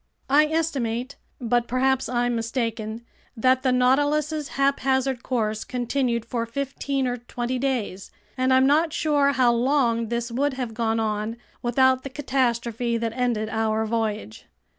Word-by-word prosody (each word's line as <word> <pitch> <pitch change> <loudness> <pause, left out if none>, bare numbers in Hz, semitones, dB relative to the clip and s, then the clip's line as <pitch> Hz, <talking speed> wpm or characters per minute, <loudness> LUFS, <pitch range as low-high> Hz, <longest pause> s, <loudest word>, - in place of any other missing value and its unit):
I 300 +2 +6
estimate—but 245 -5 -2
perhaps 265 +1 +1
I'm 245 -1 0
mistaken—that 230 +2 -2
the 260 -1 +2
Nautilus's 290 +4 +2
haphazard 270 -2 +1
course 220 -4 -1
continued 245 -1 -1
for 235 -1 -3
fifteen 275 +2 -2
or 245 -1 -1
twenty 240 +1 -4
days, 240 -8 -2 0.3
and 255 0 +1
I'm 260 0 +5
not 310 +3 +3
sure 290 -3 +2
how 250 -2 +4
long 235 -2 +1
this 235 0 -2
would 270 +3 0
have 250 -4 -4
gone 225 0 0
on 215 +1 -2 0.2
without 260 +2 +3
the 275 - -6
catastrophe 240 -4 -1
that 230 -1 -2
ended 240 -4 0
our 220 0 0
voyage. 215 - -3
245 Hz, 135 wpm, -24 LUFS, 230-270 Hz, 0.3 s, I